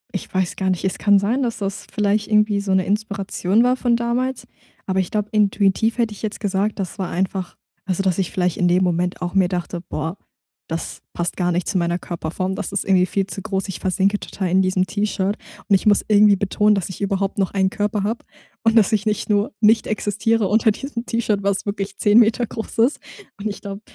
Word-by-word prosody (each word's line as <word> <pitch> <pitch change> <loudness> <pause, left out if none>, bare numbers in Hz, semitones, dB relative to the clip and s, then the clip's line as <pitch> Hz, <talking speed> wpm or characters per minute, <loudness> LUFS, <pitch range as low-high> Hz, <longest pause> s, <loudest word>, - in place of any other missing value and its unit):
Ich 190 - -5
weiß 185 -2 -1
gar 190 -1 0
nicht, 185 0 -1
es 190 - -1
kann 205 -1 +5
sein, 215 +7 +1
dass 235 -3 -1
das 200 -1 -4
vielleicht 210 0 +1
irgendwie 210 -1 +3
so 200 -1 -3
'ne 190 -1 +3
Inspiration 200 0 0
war 250 +1 +3
von 245 -2 +1
damals, 240 +2 -1 0.4
aber 190 0 0
ich 185 - -1
glaube, 210 -1 -2
intuitiv 210 +1 +2
hätte 230 -3 0
ich 205 - -12
jetzt 215 -1 -4
gesagt, 205 0 -1
das 190 -1 -4
war 185 - -2
einfach 185 0 -3 0.3
also, 185 0 -1
dass 185 -3 +1
ich 190 -3 -1
vielleicht 180 -2 0
in 180 -1 +2
dem 180 +1 +3
Moment 180 0 0
auch 175 -1 -3
mir 190 -2 +4
dachte: 175 -1 -3
„Boah, 160 0 -4 0.5
das 165 0 -4
passt 175 0 -2
gar 180 -1 0
nicht 175 0 -1
zu 205 - 0
meiner 170 0 0
Körperform. 175 +2 -3
Das - - -4
ist 200 - -1
irgendwie 185 -2 +4
viel 195 0 0
zu 195 - -6
groß. 195 +1 -2
Ich 190 - -5
versinke 195 +2 +1
total 190 - -4
in 185 +2 +4
diesem 185 0 +1
T-Shirt 205 0 -1 0.3
und 200 - +5
ich 190 - 0
muss 205 -1 +4
irgendwie 210 -1 +6
betonen, 210 +2 +2
dass 195 -4 -2
ich 190 - -8
überhaupt 195 0 -1
noch 195 - +1
einen 190 -1 +2
Körper 205 -1 -1
habe 225 +3 -2 0.4
und 225 0 +3
dass 210 -4 +5
ich 210 0 +1
nicht 215 +2 -1
nur 205 +5 +2
nicht 220 +1 +5
existiere 215 +1 0
unter 220 +3 +3
diesem 240 +1 -5
T-Shirt, 215 -3 0
was 200 0 0
wirklich 200 -1 -4
10 210 +1 +5
Meter 230 +1 +3
groß 225 +2 -7
ist.“ 235 +6 +3 0.4
Und 205 - -3
ich 200 - -6
glaube, 200 0 -7
200 Hz, 225 wpm, -21 LUFS, 190-215 Hz, 0.5 s, irgendwie